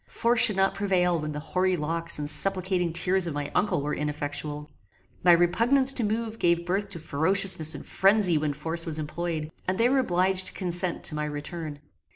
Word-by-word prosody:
Force 235 0 0
should 210 -3 +7
not 195 0 +1
prevail 185 -3 0
when 150 0 -5
the 150 - -5
hoary 185 +4 -1
locks 165 +2 -2
and 150 -1 -4
supplicating 185 +1 +2
tears 180 +2 +3
of 160 - -5
my 145 -1 -4
uncle 200 -8 0
were 150 - -3
ineffectual. 150 0 -4 0.6
My 175 - +6
repugnance 230 +11 +3
to 250 - 0
move 225 +1 -3
gave 170 0 +1
birth 195 +3 -2
to 195 - -6
ferociousness 165 +1 +1
and - - -9
phrenzy 195 -3 +2
when 150 -1 -1
force 165 +3 -4
was 160 -1 -1
employed, 155 0 -4 0.2
and 185 0 -1
they 235 +2 +3
were 270 +1 +2
obliged 185 -4 +2
to - - -3
consent 180 -1 -3
to - - 0
my 150 0 -3
return. 150 0 -7
175 Hz, 195 wpm, -26 LUFS, 155-195 Hz, 0.6 s, should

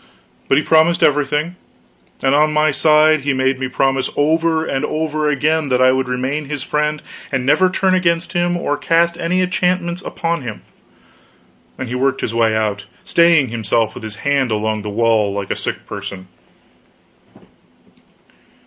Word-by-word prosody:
But 135 - +3
he 150 - +2
promised 165 +2 +3
everything; 150 +4 +1 0.7
and 135 0 +2
on 150 +1 +3
my 155 0 +2
side 155 +1 +4
he 140 0 0
made 130 0 0
me 130 - -2
promise 135 +1 0
over 160 +2 +1
and 135 -3 -2
over 155 -1 -1
again 150 +1 0
that 125 -1 +1
I 130 0 +5
would 130 0 -1
remain 130 +4 -2
his 145 -3 -4
friend, 150 0 -2 0.3
and 130 -2 -1
never 185 +7 +3
turn 185 0 +1
against 170 -1 0
him 175 0 0
or 145 -4 -2
cast 170 +2 +1
any 180 +2 0
enchantments 180 -1 -1
upon 170 -4 -3
him. 115 -5 -7 1.1
Then 130 - -4
he 120 - -6
worked 130 +1 0
his 115 - -3
way 115 -1 +2
out, 105 -2 -2 0.2
staying 170 -6 +4
himself 110 -1 -1
with - - -9
his 110 -2 -6
hand 140 -3 +1
along 110 0 -1
the 105 - -6
wall, 110 -1 +1
like 100 -1 -4
a - - 0
sick - - -5
person. 100 -2 -8
145 Hz, 165 wpm, -18 LUFS, 125-160 Hz, 1.1 s, I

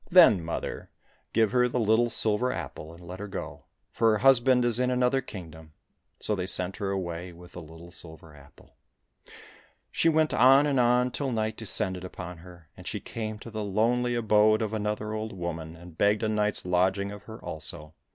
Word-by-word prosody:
— - - -29
" - - -24
Then, 105 - +7
mother, 85 - -5 0.4
give 110 -2 +2
her 125 0 +3
the 125 0 -2
little 115 +2 +3
silver 115 +2 +1
apple, 80 -9 -7
and 85 +1 -14
let 90 +2 -8
her 105 - -5
go, 95 - -7 0.3
for 115 -1 +3
her - - +2
husband 130 0 +4
is 120 0 +3
in 125 0 +1
another 125 +1 +2
kingdom." 80 -9 -11 0.5
So 105 - -2
they 95 -2 -2
sent 95 0 +2
her 100 -2 -3
away 90 -2 -4
with 90 +1 -14
the 90 - -9
little 80 +2 -13
silver 80 -2 -9
apple. 70 0 -19 1.1
She 165 - +2
went 155 -1 +2
on 135 +4 +6
and 140 -3 +1
on 125 +1 +3
till 135 +1 -3
night 110 -1 -1
descended 95 -4 0
upon 90 -2 -8
her, 85 -1 -15
and - - -12
she - - -3
came 110 -1 -5
to 115 - -9
the 110 -1 -4
lonely 120 +5 +1
abode 110 -1 +3
of 110 0 -3
another 105 0 -2
old 110 0 -4
woman, 85 -3 -5
and 85 0 -13
begged 105 +2 +2
a - - +1
night's 105 -2 0
lodging 95 +2 +1
of 105 - -10
her 110 0 -9
also. 75 0 -6
105 Hz, 200 wpm, -27 LUFS, 90-120 Hz, 1.1 s, Then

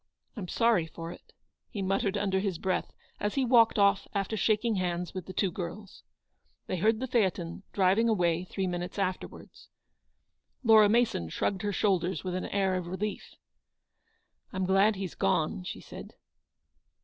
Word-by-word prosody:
I'm 200 -6 -5
sorry 230 -6 +2
for 165 +1 -7
it," - - -14 0.4
he 200 - -4
muttered 195 +1 0
under 190 -2 +1
his 190 -3 -2
breath 185 +2 -1 0.3
as 205 0 -2
he 270 -2 +2
walked 230 -3 +5
off 200 -1 +3
after 200 +2 -1
shaking 215 +1 +1
hands 180 -1 -2
with 185 -2 -6
the - - -6
two 185 0 0
girls. 190 +3 -7 0.6
They 185 - -3
heard 220 +5 +2
the 260 - -2
phaeton 190 -9 0
driving 200 +4 +3
away 175 -4 +1
three 190 +1 -3
minutes 180 +1 -4
afterwards. 185 -2 -5 0.9
Laura 220 -3 +7
Mason 225 - +1
shrugged 190 - -1
her 205 - -1
shoulders 190 -2 0
with 185 -1 -3
an 185 - -2
air 195 -2 +1
of 180 -2 -2
relief. 190 +4 -4
*f - - -34 1.2
I' - - -8
m 185 0 0
glad 195 +3 +4
he's 190 -3 -5
gone," 160 +4 0
she - - -5
said. - - -11
195 Hz, 165 wpm, -29 LUFS, 180-210 Hz, 1.2 s, Laura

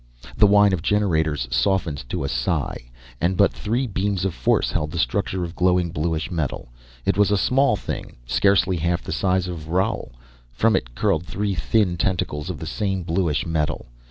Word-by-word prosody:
The 105 - +5
whine 105 0 +5
of 90 - -1
generators 80 -9 +1
softened 70 0 0
to - - -2
a - - -1
sigh, - - -2 0.3
and 90 +2 +1
but 100 - +4
three 120 +5 -1
beams 100 -3 -1
of 95 - -1
force - - +1
held 75 - -1
the 85 - -6
structure 95 0 0
of 85 0 -6
glowing, 90 -2 +2
bluish 80 +2 -2
metal. 80 -8 -3 0.4
It 95 - +1
was 105 - +5
a 105 - +3
small 135 +3 +3
thing, - - -6
scarcely 95 +7 +2
half 85 +2 -1
the - - -6
size 95 -1 +1
of 85 -4 -6
Roal. 95 - -1 0.4
From 110 - +2
it - - -3
curled 80 +3 0
three 100 0 -2
thin 85 - +1
tentacles 85 -3 -1
of 90 - -4
the 80 - -7
same 95 +1 -2
bluish 80 -3 0
metal. 75 -6 -2
90 Hz, 185 wpm, -23 LUFS, 80-100 Hz, 0.4 s, The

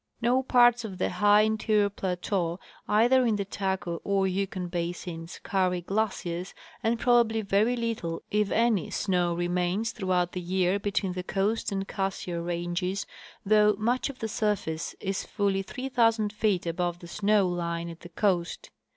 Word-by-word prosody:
No 245 +2 +2
parts 245 -2 +4
of 195 -4 -6
the - - 0
high 205 +3 +5
interior 215 -1 +2
plateau, 180 -2 -2 0.3
either 240 +5 +4
in 230 -3 +2
the 200 -1 -2
Taku 190 -3 -2
or 195 -1 +1
Yukon 190 -1 -2
basins, 170 -1 -5
carry 185 -2 0
glaciers, 185 -2 -2 0.3
and 230 0 0
probably 235 -3 +3
very 205 +5 +2
little, 225 -9 -3
if 210 -1 +2
any, 225 -6 +2
snow 180 -3 0
remains 180 +5 0
throughout 185 -4 0
the 180 - -4
year 185 +2 +1
between 200 -2 -1
the 180 - -3
Coast 205 +4 -1
and 195 0 -2
Cassiar 190 -3 -3
ranges, 175 +2 -2 0.4
though 210 0 +5
much 240 +6 0
of 275 - -8
the 225 - -3
surface 205 -7 -2
is 195 -1 -2
fully 200 -2 0
3,000 225 -2 0
feet 210 -5 +1
above 175 +1 -1
the 175 - -11
snow 205 +2 +2
line 170 -1 -2
at 165 -1 -8
the 175 - -11
coast. 175 -1 -1
195 Hz, 155 wpm, -28 LUFS, 175-215 Hz, 0.4 s, high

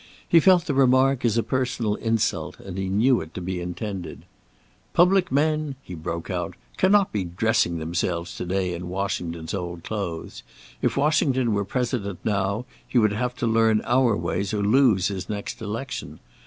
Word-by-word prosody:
He 170 - +6
felt 180 0 +5
the 145 - -1
remark 130 0 +4
as 115 -2 +2
a 115 - +2
personal 125 -4 -1
insult, 115 +1 -1
and 95 -2 -8
he 95 0 -2
knew 115 +6 +3
it 80 0 -10
to - - -3
be 90 0 -3
intended. 90 +1 -5 0.7
"Public 185 +1 +4
men," 150 0 +1
he 90 - -9
broke 85 0 -5
out, - - -3 0.2
"cannot 200 0 +4
be 105 -3 -1
dressing 90 -1 +1
themselves 85 +1 -2
to - - -4
day 90 -1 0
in 90 +1 -6
Washington's 85 -4 -3
old 85 -3 -4
clothes. 95 -7 -5 0.4
If - - 0
Washington 135 -5 +2
were 100 -1 0
President 115 -4 -2
now, 100 +2 0 0.2
he - - -1
would 110 -3 +4
have 125 +3 -2
to 125 - -2
learn 110 -1 +3
our 120 -3 +3
ways 90 +5 -2
or 100 - 0
lose 105 -4 +4
his 95 -2 -5
next 105 +3 -5
election. 115 +5 -5
105 Hz, 170 wpm, -24 LUFS, 90-125 Hz, 0.7 s, He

